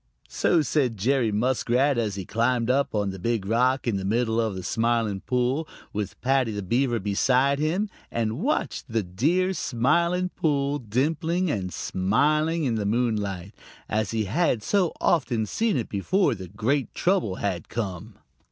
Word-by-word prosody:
So 165 -3 +2
said 130 -5 0
Jerry 120 +2 +1
Muskrat, 125 +4 +1
as 105 -4 -1
he 95 -2 -5
climbed 115 +3 +1
up 135 -3 0
on 100 -2 0
the 95 - -8
Big 115 0 -1
Rock 125 +5 +2
in 115 -5 0
the 95 - -4
middle 115 +3 +1
of 110 -4 -2
the 95 - -6
Smiling 115 -2 0
Pool, 125 +8 0 0.3
with 105 -2 -4
Paddy 130 -2 +2
the 105 -1 -4
Beaver 120 +5 +1
beside 125 +7 +2
him, 170 +8 0 0.2
and 115 -1 -2
watched - - -1
the 110 -2 0
dear 160 - +1
Smiling 170 +6 +1
Pool 145 -4 0
dimpling 160 - 0
and 95 -6 -3
smiling 150 - +1
in 125 -5 +1
the 110 -2 -1
moonlight, 105 -4 -1 0.3
as 110 -1 -1
he 110 -1 -1
had 120 - +1
so 190 -5 +2
often 125 -9 +1
seen 220 - 0
it 115 - -2
before 180 - +1
the 95 -4 -7
great 120 - -1
trouble 180 - +1
had 95 -4 -3
come. 95 -7 -5
120 Hz, 160 wpm, -25 LUFS, 105-145 Hz, 0.3 s, So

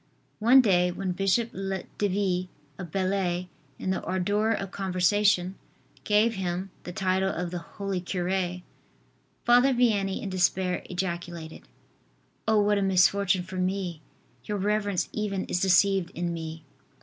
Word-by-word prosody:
One 245 +5 +7
day, 180 -6 +3
when 185 +1 -3
Bishop 195 +5 +1 0.5
Devie, 190 -2 0 0.3
of 180 - -6
Belley, 185 -1 -1 0.3
in 190 - -2
the 190 - -1
ardor 205 +4 0
of 195 -4 -1
conversation, 190 0 +2 0.5
gave 215 +2 +3
him 185 -1 -3
the 180 - -5
title 190 +1 0
of 175 -2 -3
the 175 - -3
"holy 195 +2 -4
cure," 180 0 -2 0.8
Father 245 +3 +5
Vianney 205 -6 +1
in 200 - -3
despair 185 0 +1
ejaculated: 175 -3 -5 0.8
"Oh, 220 -1 +4
what 205 0 +2
a - - 0
misfortune 190 0 +3
for 185 +1 -8
me! 185 -3 -2 0.4
Your 210 - -3
reverence 205 -1 0
even 200 -3 -2
is 180 - -1
deceived 190 0 +3
in 175 0 -2
me." 160 -1 -6
190 Hz, 135 wpm, -27 LUFS, 180-200 Hz, 0.8 s, One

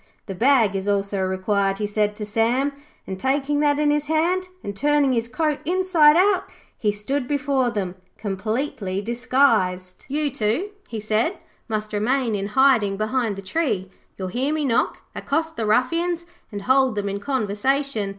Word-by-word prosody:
'The 195 - -5
bag 230 -1 +3
is 195 +1 -3
also 200 -1 0
required,' 195 +1 0
he 210 - -2
said 210 0 0
to 210 - -5
Sam, 230 +6 +1 0.3
and 190 -1 -6
taking 280 +4 0
that 290 -1 +3
in 295 0 +2
his 295 0 0
hand 345 +4 +1 0.2
and 200 - -5
turning 290 +2 +2
his 230 -1 0
coat 305 +3 -1
inside 345 -3 +4
out, 380 0 +3 0.3
he 210 - 0
stood 245 +6 -3
before 280 -3 +1
them 200 -6 -3 0.2
completely 215 0 -3
disguised. 225 -6 +1
'You 290 +1 -1
two,' 250 - -1 0.2
he 225 - -5
said, 215 - 0 0.3
'must 215 -1 -3
remain 235 +3 +1
in 200 -1 -2
hiding 235 -8 +4
behind 215 0 0
the 195 - -8
tree. 195 - -1 0.3
You 190 - -6
will - - -4
hear 260 +8 -1
me 310 -1 0
knock, 235 -4 0
accost 320 +2 -2
the 220 - -2
ruffians 335 +10 +1 0.3
and 205 -2 -6
hold 260 -1 +3
them 205 -1 -2
in 200 0 -3
conversation. 255 0 -1
240 Hz, 170 wpm, -23 LUFS, 205-290 Hz, 0.3 s, inside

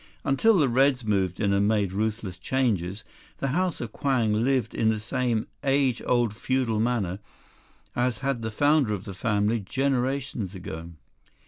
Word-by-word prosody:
"Until 195 +11 +3
the 150 -5 +4
Reds 130 0 +3
moved 95 -4 0
in 100 -2 +2
and 100 +1 +3
made 105 -4 +1
ruthless 105 -3 -2
changes, 105 -6 -1 0.3
the 135 - -2
House 180 +4 0
of 120 -2 -5
Kwang 125 -6 +1
lived 125 +2 +1
in 110 - +2
the 110 -1 0
same 120 0 -1 0.2
age 135 -2 +2
old 120 -4 +2
feudal 125 -2 0
manner 110 -6 0 0.8
as 120 -1 +1
had 135 -4 0
the 110 - -2
founder 145 -1 +2
of 95 - -8
the 100 - -7
family 105 +3 +1
generations 130 -2 -1
ago. 85 -2 -7
115 Hz, 155 wpm, -26 LUFS, 105-135 Hz, 0.8 s, the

